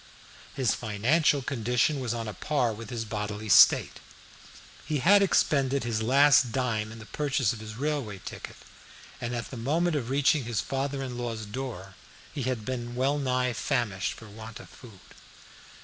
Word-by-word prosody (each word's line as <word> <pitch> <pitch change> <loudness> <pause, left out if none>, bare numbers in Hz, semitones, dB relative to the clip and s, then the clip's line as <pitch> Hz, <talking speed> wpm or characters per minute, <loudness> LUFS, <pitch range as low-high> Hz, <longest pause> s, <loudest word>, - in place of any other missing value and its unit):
His 130 -5 +1
financial 130 +7 +1
condition 125 +3 0
was 125 -3 -2
on 115 -1 -3
a 105 - -5
par 125 +2 0
with 110 0 -9
his 115 -2 -4
bodily 105 0 -4
state. - - +6 0.8
He 150 - -1
had 200 +10 +5
expended 140 -8 +2
his 115 -2 -1
last 135 +1 +5
dime 110 -4 -1
in 110 - -10
the 110 - -11
purchase 135 -4 0
of 115 - -9
his 110 0 -8
railway 135 -6 -2
ticket, - - -8 0.7
and 120 0 -3
at 120 - -5
the 130 - -7
moment 160 +8 0
of 125 -5 -2
reaching 140 0 +2
his 115 -4 -2
father 135 +3 -2
in 125 -2 -5
law's 115 -3 -4
door 105 -4 -6 0.4
he 145 - -4
had 125 -4 -2
been 120 -1 -4
well 135 +3 +1
nigh 125 -2 0
famished 115 -7 -1
for 115 - -12
want 110 +2 -10
of - - -13
food. 110 -7 -15
125 Hz, 170 wpm, -28 LUFS, 110-140 Hz, 0.8 s, state